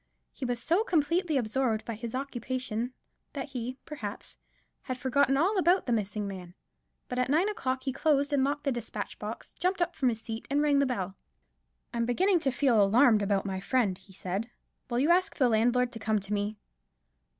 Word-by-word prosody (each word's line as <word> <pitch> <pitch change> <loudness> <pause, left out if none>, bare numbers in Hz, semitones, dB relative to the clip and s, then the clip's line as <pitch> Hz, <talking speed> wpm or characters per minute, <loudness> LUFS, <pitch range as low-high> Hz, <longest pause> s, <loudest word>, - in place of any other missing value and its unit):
He 265 - -5
was 245 -1 -1
so 345 - +2
completely 335 - +1
absorbed 230 -2 0
by 230 - -3
his 230 +2 -6
occupation, 255 -2 -3 0.4
that 280 0 -4
he, 255 -1 -4
perhaps, 220 -9 -7 0.5
had 255 -2 -4
forgotten 270 +1 +2
all 380 +7 +2
about 360 +1 +3
the 245 - +1
missing 210 -1 -1
man: 180 -2 -8 0.5
but 250 - -3
at 250 - +1
nine 325 +8 +3
o'clock 265 -12 -2
he 265 - -2
closed 285 0 +2
and 275 -2 +3
locked 290 +2 -1
the 280 - +1
despatch 240 -3 -5
box, - - -7
jumped 365 +1 +1
up 345 -1 0
from 260 -4 +2
his 225 -2 -2
seat 225 0 -6
and 285 +1 +2
rang 290 -2 +4
the 280 - +3
bell. 195 -6 -3 0.8
"I - - -3
am 235 0 +1
beginning 360 +9 +3
to 280 - +1
feel 245 -4 +3
alarmed 220 +2 +5
about 200 -1 +1
my 190 -1 -2
friend," 210 -2 +1
he 190 - -18
said; 190 +4 -4 0.4
"will 240 - -1
you 290 +7 +3
ask 365 +1 +3
the 260 - +3
landlord 240 +2 +2
to 225 - -7
come 220 -1 +1
to 200 +1 -3
me?" 205 +1 -1
250 Hz, 200 wpm, -29 LUFS, 220-285 Hz, 0.8 s, alarmed